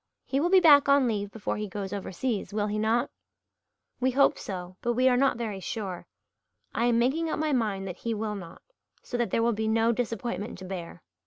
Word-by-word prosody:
He 270 - 0
will 340 +4 +1
be 380 0 +7
back 290 -5 +7
on 280 -2 +5
leave 205 -3 -1
before 210 0 -4
he 210 0 -3
goes 195 0 -5
overseas, 205 +2 -3
will 205 0 0
he 210 0 -2
not?" 230 +4 +1 0.9
"We 255 - +2
hope 275 +2 +3
so 185 -2 -6
but 240 0 0
we 255 +2 +3
are 250 - +5
not 265 -1 +2
very 215 -5 -4
sure. 190 -2 -5 0.7
I 235 - +1
am 240 -1 +3
making 285 +8 +1
up - - -1
my 305 -1 0
mind 205 -6 0
that 180 -1 -6
he 230 -1 -3
will 215 0 -2
not, 180 -5 -9 0.4
so - - -6
that 240 -1 0
there 230 - +1
will 235 0 +2
be 220 +1 -2
no 225 +1 +3
disappointment 230 -3 -3
to 185 - -9
bear. 175 -2 -7
225 Hz, 220 wpm, -28 LUFS, 200-250 Hz, 0.9 s, be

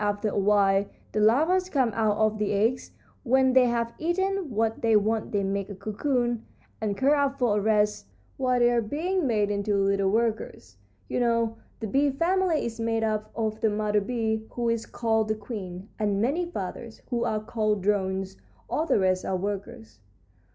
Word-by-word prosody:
After 205 +1 0
a - - -5
while 200 0 +3 0.2
the 215 - -1
larvas 320 +13 +3
come 260 -8 +1
out 215 -1 +1
of 215 0 +1
the 210 -1 0
eggs. 225 +5 0 0.3
When 260 +1 +3
they 255 -1 +6
have 235 -1 -1
eaten 380 +1 -1
what 225 -1 -1
they 225 -1 +3
want 215 +1 +1
they 205 -1 0
make 195 0 -2
a 200 - -6
cocoon, 240 +3 -1 0.4
and 205 -2 -1
curl 275 +5 +3
up 275 0 -1
for 230 -5 +2
a - - -2
rest 210 0 +1 0.3
while 255 -1 +1
they 240 0 +4
are 240 -1 +2
being 320 - -1
made 210 -3 +1
into 205 0 0
little 195 0 +2
workers. 215 - -2 0.3
You - - -2
know, 230 -2 +1 0.2
the - - -2
bee 275 +7 +2
family 335 +3 +1
is 230 0 -5
made 225 0 0
up 215 -1 -1
of 220 -1 -2
the 220 - +3
mother 210 0 +1
bee, 220 0 -2
who 235 -1 -2
is 230 -1 -1
called 220 -2 0
the 215 - 0
queen, 200 -4 -7
and 205 -2 0
many 295 - 0
fathers, 225 - -6
who 235 -1 0
are 215 - 0
called 215 -2 -1
drones; 190 -1 -1 0.3
all 315 - -1
the - - +3
rest 185 -1 +1
are 190 - -1
workers." 185 - -6
220 Hz, 185 wpm, -26 LUFS, 205-245 Hz, 0.4 s, they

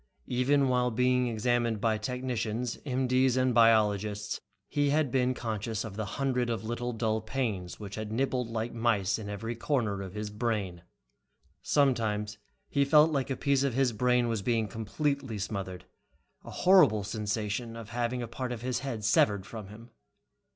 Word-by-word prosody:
Even 135 +3 +2
while 125 -1 +2
being 125 +1 +2
examined 120 0 0
by 110 0 +2
technicians, 120 0 -3
M.D.'s 130 0 +2
and 130 -1 +2
biologists, 105 -3 +3 0.3
he 145 -1 +1
had 145 -2 +2
been 130 0 +1
conscious 110 -2 -3
of 95 - -7
the 110 0 -3
hundreds 125 -3 0
of 115 -3 -2
little 120 +2 -3
dull 110 -1 -1
pains 110 -7 -3
which 100 -2 -8
had 110 0 -5
nibbled 125 0 0
like 115 +1 -3
mice 115 -4 +1
in 105 -2 -6
every 110 +3 -4
corner 115 -6 -1
of 95 0 -7
his 105 0 -4
brain. 105 -6 -2 0.8
Sometimes 110 -7 +1 0.3
he 140 - +2
felt 150 +3 +5
like 140 -2 -1
a 135 - -1
piece 140 -2 +2
of 135 -4 0
his 130 -3 +2
brain 125 +2 +2
was 115 -3 -1
being 115 +1 +1
completely 120 +4 -2
smothered, 95 -2 -5 0.6
a - - -10
horrible 180 - +5
sensation 105 +2 -3
of 115 -2 -8
having 120 +2 -2
a - - -4
part 125 +2 -4
of 120 -1 -5
his 125 0 -1
head 130 -6 -4
severed 105 -3 +3
from 110 -3 -8
him. 115 +4 -13
115 Hz, 165 wpm, -29 LUFS, 105-125 Hz, 0.8 s, felt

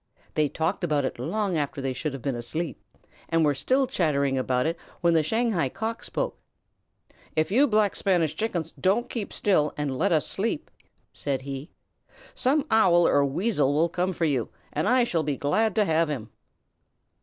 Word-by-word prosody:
They 150 -2 +2
talked 165 +6 -2
about 150 -5 +1
it 130 - -4
long 185 - -1
after 145 -1 -3
they 135 -1 -2
should 150 +2 -3
have 135 - -7
been 140 - 0
asleep, 135 +4 -4 0.5
and 165 -1 +3
were 145 - +3
still 255 - +1
chattering 140 - +1 0.7
when 170 -1 +4
the 160 - +4
Shanghai 210 - 0
Cock 225 - -4
spoke: - - -3 1.0
"If 155 +3 +1
you 270 +7 +5
Black 210 -4 +2
Spanish 170 -6 +1
Chickens 180 -5 -2
don't 200 +6 +1
keep 220 -5 -4
still 155 -7 +1
and 145 -3 -2
let 180 +8 +1
us 155 -3 +3
sleep," 230 +10 -3 0.4
said 135 -2 -3
he, 135 +1 -6 0.6
"some 280 +3 +1
Owl 175 -6 +5
or 145 - +4
Weasel 145 -1 +1
will 165 +3 +3
come 180 +2 -1
for 170 -2 -1
you, 135 -7 0 0.2
and 155 - 0
I 250 0 +4
shall 175 -8 0
be 145 -3 -2
glad 215 +9 +1
to 215 -2 +3
have 160 -2 +2
him!" 115 -7 -5
165 Hz, 175 wpm, -26 LUFS, 145-205 Hz, 1.0 s, you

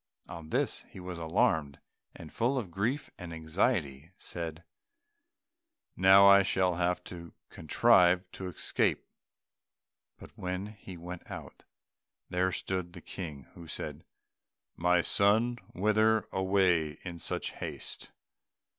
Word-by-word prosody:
On 80 -2 -9
this - - 0
he - - -11
was 90 -1 -6
alarmed, 80 - +1 0.4
and, 80 -3 -11
full 125 +4 +1
of 105 -9 -3
grief 120 - -2
and 90 -3 -7
anxiety, 80 - -1
said, 85 -1 -6 1.3
"Now 95 +1 +7
I 100 0 +8
shall 95 -2 +2
have 90 +1 0
to 85 -2 -10 0.2
contrive 90 0 +4
to 95 - -6
escape." 90 - 0 1.1
But - - -13
when 90 +1 -3
he 95 -3 -11
went 90 +1 -9
out, - - -9 0.7
there 90 +1 +1
stood 90 -1 -3
the 85 - -10
King, 75 -7 -7
who 85 -1 -11
said, - - -6 0.7
"My 90 0 +3
son, 115 +5 +2 0.2
whither 110 +3 +3
away 95 -5 +2
in 85 -2 -7
such - - -3
haste? - - -7
90 Hz, 120 wpm, -30 LUFS, 85-100 Hz, 1.3 s, I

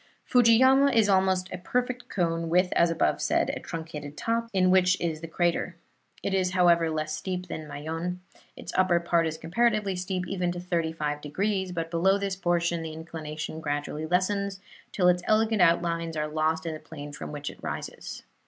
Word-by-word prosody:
Fujiyama 260 +3 +5
is 225 -5 +3
almost 190 -1 +2
a 180 - -5
perfect 250 +5 -2
cone, 165 -3 -1
with, 180 +2 +3
as 170 - +4
above 165 -2 +1
said, - - +1
a - - -5
truncated 150 -3 -7
top, 230 0 -1
in 185 -2 +3
which 185 0 +4
is 160 -2 -2
the 165 - -6
crater. 175 +1 0 0.5
It 195 - -1
is, 185 -1 +1
however, 170 -2 +4
less 155 -1 -2
steep 180 +1 -4
than 155 -2 -6
Mayon. 165 +5 -4 0.4
Its - - -8
upper 185 -2 +3
part 170 -1 +1
is 160 0 -4
comparatively 210 +3 +1
steep, 180 0 -3
even 180 -2 -1
to 175 - -5
thirty 170 -2 -1
five 150 -2 -3
degrees, 190 +5 -1
but 165 -1 -4
below 190 +4 +3
this 200 -1 -2
portion 175 -2 0
the 160 -1 -5
inclination 155 -1 -6
gradually 145 +1 -3
lessens, 195 +2 0 0.3
till 180 -3 +2
its 180 0 +4
elegant 220 -1 +3
outlines 170 -1 +2
are 150 0 -1
lost 160 +1 0
in 165 - -2
the 155 - -7
plain 145 -2 -9
from 145 - -7
which 145 0 -5
it - - -17
rises. - - -6
175 Hz, 185 wpm, -27 LUFS, 160-190 Hz, 0.5 s, Fujiyama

